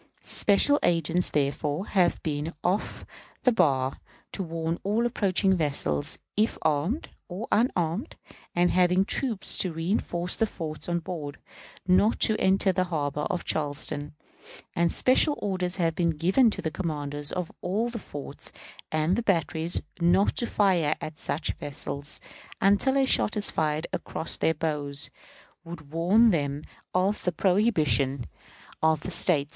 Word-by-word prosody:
Special 285 Hz, +8 st, +3 dB
agents, 170 Hz, +1 st, +1 dB
therefore, 145 Hz, +4 st, -1 dB
have 185 Hz, -5 st, +1 dB
been 150 Hz, +1 st, -3 dB
off 185 Hz, +4 st, -1 dB, 0.4 s
the 250 Hz, -, +5 dB
bar, 135 Hz, -, +1 dB, 0.3 s
to -, -, -4 dB
warn 165 Hz, -1 st, -3 dB
all 215 Hz, +4 st, 0 dB
approaching 195 Hz, -4 st, +1 dB
vessels, 140 Hz, -, -1 dB, 0.2 s
if 215 Hz, +2 st, +1 dB
armed, 160 Hz, -, 0 dB, 0.2 s
or 190 Hz, +6 st, -6 dB
unarmed 205 Hz, -, 0 dB, 0.4 s
and 175 Hz, 0 st, +3 dB
having 180 Hz, +1 st, +3 dB
troops 225 Hz, -3 st, +2 dB
to 185 Hz, -, +1 dB
reënforce 175 Hz, +1 st, -1 dB
the 225 Hz, -, +1 dB
forts 155 Hz, -4 st, -6 dB
on 170 Hz, -, +1 dB
board, 160 Hz, -4 st, -6 dB, 0.5 s
not 195 Hz, +4 st, +3 dB
to 220 Hz, -, +4 dB
enter 190 Hz, +1 st, +3 dB
the 185 Hz, 0 st, 0 dB
harbor 150 Hz, -4 st, -2 dB
of 180 Hz, -3 st, -3 dB
Charleston; 145 Hz, 0 st, -2 dB, 0.6 s
and 170 Hz, -1 st, +2 dB
special 290 Hz, +3 st, +3 dB
orders 185 Hz, -2 st, -2 dB
have 165 Hz, -3 st, 0 dB
been 165 Hz, -2 st, 0 dB
given 190 Hz, -, +4 dB
to -, -, -4 dB
the 160 Hz, -, -2 dB
commanders 145 Hz, -3 st, -2 dB
of 180 Hz, -2 st, -3 dB
all 210 Hz, +6 st, -1 dB
the 235 Hz, -1 st, -5 dB
forts 145 Hz, -7 st, -9 dB, 0.4 s
and 160 Hz, +9 st, +1 dB
batteries 165 Hz, -3 st, 0 dB, 0.2 s
not 175 Hz, +4 st, +3 dB
to 235 Hz, -, 0 dB
fire 180 Hz, -9 st, +2 dB
at 155 Hz, -1 st, -7 dB
such 155 Hz, +1 st, -2 dB
vessels 145 Hz, 0 st, -6 dB, 0.4 s
until 205 Hz, +8 st, +3 dB
a 270 Hz, -, +4 dB
shot 225 Hz, -4 st, +3 dB
fired 155 Hz, -6 st, 0 dB
across 160 Hz, -, -2 dB
their 160 Hz, -, +1 dB
bows 145 Hz, -2 st, -2 dB, 0.5 s
would 165 Hz, -4 st, -10 dB
warn 195 Hz, +8 st, +4 dB
them 145 Hz, -3 st, -1 dB, 0.3 s
of 190 Hz, +3 st, 0 dB
the 180 Hz, -, +1 dB
prohibition 155 Hz, -, +1 dB, 0.6 s
of 160 Hz, -1 st, +2 dB
the 185 Hz, -, -4 dB
State. 155 Hz, -4 st, +2 dB
170 Hz, 140 wpm, -27 LUFS, 150-195 Hz, 0.6 s, the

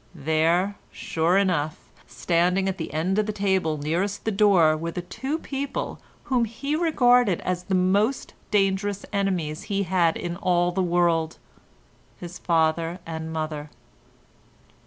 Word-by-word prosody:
There, 165 Hz, +6 st, +1 dB
sure 165 Hz, +3 st, 0 dB
enough, 170 Hz, -6 st, +1 dB, 0.3 s
standing 180 Hz, +3 st, +1 dB
at 190 Hz, -1 st, -2 dB
the 160 Hz, -, -4 dB
end 180 Hz, +6 st, 0 dB
of 215 Hz, -, 0 dB
the -, -, 0 dB
table 190 Hz, -6 st, 0 dB
nearest 175 Hz, +8 st, -2 dB
the 220 Hz, -, +1 dB
door 195 Hz, -7 st, +4 dB
were 165 Hz, +2 st, -4 dB
the 175 Hz, +1 st, -5 dB
two 270 Hz, -, -4 dB
people 280 Hz, -3 st, -4 dB, 0.2 s
whom 250 Hz, -3 st, +1 dB
he 255 Hz, +7 st, -3 dB
regarded 245 Hz, -, +3 dB
as 180 Hz, 0 st, -3 dB
the 190 Hz, -, 0 dB
most 200 Hz, +8 st, +1 dB, 0.2 s
dangerous 200 Hz, 0 st, 0 dB
enemies 180 Hz, -6 st, -1 dB
he 200 Hz, -1 st, 0 dB
had 175 Hz, -3 st, +2 dB
in 175 Hz, 0 st, -4 dB
all 175 Hz, -1 st, +1 dB
the 190 Hz, +2 st, -1 dB
world—his 175 Hz, 0 st, -3 dB
father 165 Hz, 0 st, +1 dB
and 160 Hz, -1 st, -5 dB
mother. 155 Hz, -2 st, -4 dB
180 Hz, 135 wpm, -25 LUFS, 165-200 Hz, 0.3 s, door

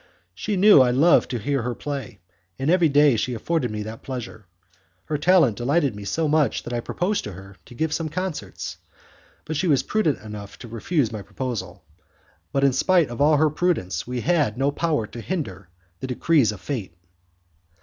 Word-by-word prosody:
She 205 Hz, -, -3 dB
knew 200 Hz, -6 st, +8 dB
I 125 Hz, -, +4 dB
loved 140 Hz, +8 st, +4 dB
to 125 Hz, -, -2 dB
hear 135 Hz, +4 st, -1 dB
her 120 Hz, +1 st, -3 dB
play, 135 Hz, -8 st, -6 dB, 0.4 s
and 135 Hz, +4 st, 0 dB
every 175 Hz, -3 st, +4 dB
day 145 Hz, -2 st, +5 dB
she 120 Hz, +3 st, -1 dB
afforded 140 Hz, +2 st, -1 dB
me 105 Hz, 0 st, -4 dB
that 110 Hz, +1 st, -8 dB
pleasure. 120 Hz, -6 st, -7 dB, 0.6 s
Her 150 Hz, -2 st, -2 dB
talent 160 Hz, -, +4 dB
delighted 140 Hz, 0 st, +1 dB
me 105 Hz, -1 st, -8 dB
so 160 Hz, +9 st, 0 dB
much 150 Hz, -5 st, +1 dB
that 120 Hz, -, -6 dB
I 120 Hz, -, 0 dB
proposed 185 Hz, -, -1 dB
to 105 Hz, -, -6 dB
her 95 Hz, +1 st, -12 dB
to 120 Hz, -, -13 dB
give 160 Hz, +4 st, -1 dB
some 165 Hz, -2 st, -2 dB
concerts, 180 Hz, +1 st, -5 dB, 0.7 s
but 160 Hz, -, -4 dB
she 180 Hz, +5 st, 0 dB
was 145 Hz, -5 st, +3 dB
prudent 190 Hz, -10 st, +1 dB
enough 105 Hz, -2 st, -8 dB
to -, -, -10 dB
refuse 115 Hz, +3 st, -1 dB
my 110 Hz, -2 st, -5 dB
proposal. 100 Hz, -4 st, -5 dB, 0.7 s
But 135 Hz, -, 0 dB
in 135 Hz, -1 st, +4 dB
spite 170 Hz, +3 st, +3 dB
of 120 Hz, +2 st, -5 dB
all 150 Hz, +1 st, +5 dB
her 155 Hz, 0 st, +3 dB
prudence 155 Hz, -, -1 dB
we 125 Hz, -1 st, -3 dB
had 150 Hz, -9 st, +1 dB
no 135 Hz, +2 st, +1 dB
power 150 Hz, -5 st, 0 dB
to 120 Hz, +2 st, -9 dB
hinder 95 Hz, -, -4 dB, 0.3 s
the 130 Hz, -, -5 dB
decrees 130 Hz, -2 st, +2 dB
of 105 Hz, -, -9 dB
fate. 110 Hz, -, -5 dB
135 Hz, 190 wpm, -23 LUFS, 110-155 Hz, 0.7 s, knew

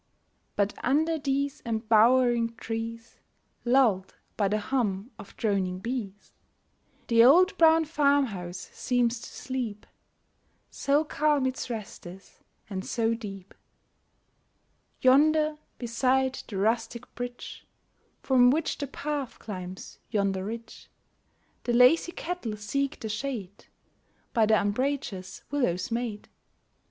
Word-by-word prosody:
But 200 Hz, 0 st, +1 dB
under 315 Hz, +5 st, +2 dB
these 280 Hz, +1 st, -1 dB
embowering 230 Hz, +1 st, +3 dB
trees, 230 Hz, 0 st, -6 dB, 0.4 s
Lulled 240 Hz, -7 st, +2 dB, 0.2 s
by 205 Hz, -, +1 dB
the 210 Hz, +2 st, +1 dB
hum 215 Hz, -1 st, -1 dB
of 205 Hz, -, -12 dB
droning 195 Hz, -4 st, 0 dB
bees, 205 Hz, -2 st, -5 dB, 0.7 s
The 230 Hz, -1 st, +5 dB
old 360 Hz, +10 st, +6 dB
brown 325 Hz, -1 st, +6 dB
farmhouse 280 Hz, -, 0 dB
seems 245 Hz, -2 st, 0 dB
to -, -, -9 dB
sleep, 240 Hz, -6 st, -5 dB, 0.9 s
So 285 Hz, +2 st, +1 dB
calm 300 Hz, -2 st, +1 dB
its 260 Hz, 0 st, -3 dB
rest 215 Hz, -6 st, -6 dB
is 185 Hz, +3 st, -13 dB, 0.3 s
and 190 Hz, -3 st, -4 dB
so 230 Hz, +1 st, 0 dB
deep. 195 Hz, -4 st, -8 dB, 1.5 s
Yonder, 305 Hz, +3 st, +4 dB, 0.2 s
beside 260 Hz, +2 st, 0 dB
the 200 Hz, -, -5 dB
rustic 225 Hz, +4 st, -1 dB
bridge, 245 Hz, 0 st, -7 dB, 0.6 s
From 250 Hz, -2 st, +5 dB
which 310 Hz, +4 st, 0 dB
the 285 Hz, -, -3 dB
path 285 Hz, -1 st, -4 dB
climbs 185 Hz, -3 st, -8 dB
yonder 195 Hz, -3 st, 0 dB
ridge, 225 Hz, +2 st, -8 dB, 0.8 s
The 240 Hz, -, 0 dB
lazy 250 Hz, +8 st, +5 dB
cattle 325 Hz, -14 st, -4 dB
seek 275 Hz, +8 st, -2 dB
the 220 Hz, -, -5 dB
shade 215 Hz, -3 st, -5 dB, 0.7 s
By 225 Hz, -4 st, +3 dB
the 220 Hz, 0 st, +4 dB
umbrageous 205 Hz, -3 st, -2 dB
willows 210 Hz, -10 st, 0 dB
made. 230 Hz, -3 st, -3 dB
235 Hz, 110 wpm, -27 LUFS, 210-275 Hz, 1.5 s, old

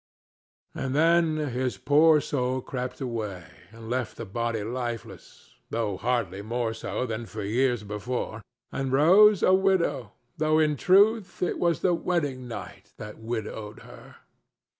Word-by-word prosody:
And 130 Hz, 0 st, -3 dB
then 165 Hz, 0 st, +3 dB, 0.2 s
his 125 Hz, 0 st, -2 dB
poor 155 Hz, +2 st, +5 dB
soul 130 Hz, -2 st, -1 dB
crept 125 Hz, +1 st, -5 dB
away 110 Hz, -8 st, -4 dB, 0.3 s
and 115 Hz, 0 st, -11 dB
left 120 Hz, -1 st, -3 dB
the 115 Hz, -, -6 dB
body 115 Hz, +1 st, -2 dB
lifeless, 120 Hz, 0 st, -6 dB, 0.2 s
though 110 Hz, -3 st, -1 dB
hardly 110 Hz, -4 st, -1 dB
more 115 Hz, +1 st, -2 dB
so 115 Hz, +2 st, -3 dB
than 115 Hz, -1 st, -5 dB
for 110 Hz, -1 st, -6 dB
years 120 Hz, +2 st, +1 dB
before, 110 Hz, +2 st, -4 dB, 0.3 s
and 135 Hz, -1 st, -3 dB
Rose 185 Hz, +9 st, +6 dB
a 185 Hz, -, +5 dB
widow, 170 Hz, -, +1 dB, 0.2 s
though 155 Hz, 0 st, +2 dB
in 155 Hz, -1 st, +3 dB
truth 200 Hz, -, +3 dB
it 180 Hz, -, -1 dB
was 170 Hz, -2 st, +1 dB
the 180 Hz, -, +3 dB
wedding 145 Hz, -7 st, -2 dB
night 115 Hz, -, -9 dB
that 105 Hz, +1 st, -9 dB
widowed 110 Hz, -2 st, -5 dB
her. -, -, -14 dB
125 Hz, 140 wpm, -26 LUFS, 115-155 Hz, 0.3 s, Rose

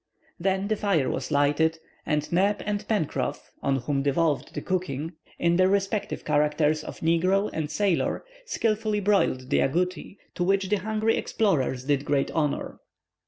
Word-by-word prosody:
Then 190 Hz, +2 st, 0 dB
the 215 Hz, -, +1 dB
fire 195 Hz, -10 st, +1 dB
was -, -, -3 dB
lighted, 150 Hz, +2 st, +2 dB, 0.3 s
and 150 Hz, -1 st, 0 dB
Neb 195 Hz, +4 st, +2 dB
and 210 Hz, 0 st, -2 dB
Pencroff, 155 Hz, -8 st, -2 dB
on 140 Hz, -1 st, +1 dB
whom 135 Hz, +2 st, -1 dB
devolved 145 Hz, -1 st, 0 dB
the -, -, -3 dB
cooking, 165 Hz, -3 st, -2 dB, 0.2 s
in 170 Hz, 0 st, +2 dB
their 185 Hz, 0 st, +5 dB
respective 200 Hz, +1 st, -1 dB
characters 150 Hz, +1 st, +2 dB
of -, -, -9 dB
negro 185 Hz, +5 st, +2 dB
and 155 Hz, -2 st, -2 dB
sailor, 200 Hz, -, 0 dB, 0.2 s
skilfully 215 Hz, -, 0 dB
broiled 170 Hz, -10 st, +1 dB
the -, -, +4 dB
agouti, 180 Hz, +6 st, -1 dB, 0.2 s
to 175 Hz, -, -1 dB
which 195 Hz, +1 st, +1 dB
the 210 Hz, -, +3 dB
hungry 215 Hz, +3 st, 0 dB
explorers 140 Hz, -, 0 dB
did 140 Hz, 0 st, +1 dB
great 145 Hz, -1 st, 0 dB
honor. 150 Hz, -3 st, -1 dB
170 Hz, 155 wpm, -26 LUFS, 145-200 Hz, 0.3 s, their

